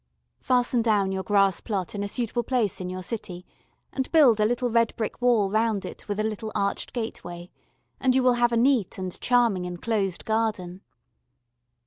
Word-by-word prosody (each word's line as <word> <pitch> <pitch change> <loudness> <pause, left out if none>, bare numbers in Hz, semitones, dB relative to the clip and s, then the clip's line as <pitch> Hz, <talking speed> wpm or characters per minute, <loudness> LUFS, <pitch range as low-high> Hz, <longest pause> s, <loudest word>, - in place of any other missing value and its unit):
Fasten 245 -1 +2
down 205 -4 +2
your 190 0 -2
grass 195 -2 +2
plot 195 -6 -3
in 205 - -4
a - - -2
suitable 240 +2 -2
place 225 -6 -1
in 180 - -4
your 185 0 -6
city 180 -4 -6 0.5
and 265 -2 -3
build 275 -9 +5
a 210 - +3
little 245 +1 -1
red 230 0 +2
brick 225 +1 -4
wall 230 -6 +3
round 220 -2 0
it - - -9
with 205 0 -3
a - - +1
little 215 0 -4
arched 200 0 -1
gateway, 175 -7 -6 0.5
and 255 -1 +2
you 260 - +3
will 250 -1 +5
have 240 0 +2
a 235 - +1
neat 240 -5 +2
and 185 -1 -6
charming 235 -7 +2
enclosed 190 +1 -2
garden. 210 -5 -2
220 Hz, 180 wpm, -25 LUFS, 190-240 Hz, 0.5 s, build